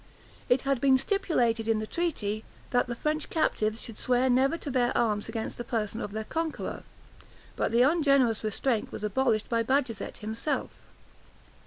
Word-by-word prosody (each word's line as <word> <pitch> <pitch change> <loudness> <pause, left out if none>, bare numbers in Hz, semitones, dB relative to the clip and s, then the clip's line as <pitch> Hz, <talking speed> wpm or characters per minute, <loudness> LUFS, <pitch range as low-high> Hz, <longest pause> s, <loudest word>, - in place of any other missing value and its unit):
It 245 +1 +3
had 275 -3 0
been 270 -1 +5
stipulated 255 - 0
in 225 -1 +3
the 215 - -2
treaty, 215 -9 -2 0.3
that 245 0 +2
the 240 - -3
French 305 +4 -1
captives 220 -8 0
should 230 -3 -9
swear 255 +1 +2
never 270 +6 +3
to 290 - -5
bear 250 -1 +1
arms 210 -2 0
against 225 +1 -4
the - - -2
person 220 -2 -2
of 205 - -4
their 220 +1 -3
conqueror; 320 +6 -3 0.7
but - - 0
the 235 +2 +5
ungenerous 275 -7 +3
restraint 215 +2 0
was - - -7
abolished 215 0 +1
by 230 -1 +1
Bajazet 255 -2 -1
himself. 220 +7 -2
240 Hz, 165 wpm, -28 LUFS, 220-275 Hz, 0.7 s, been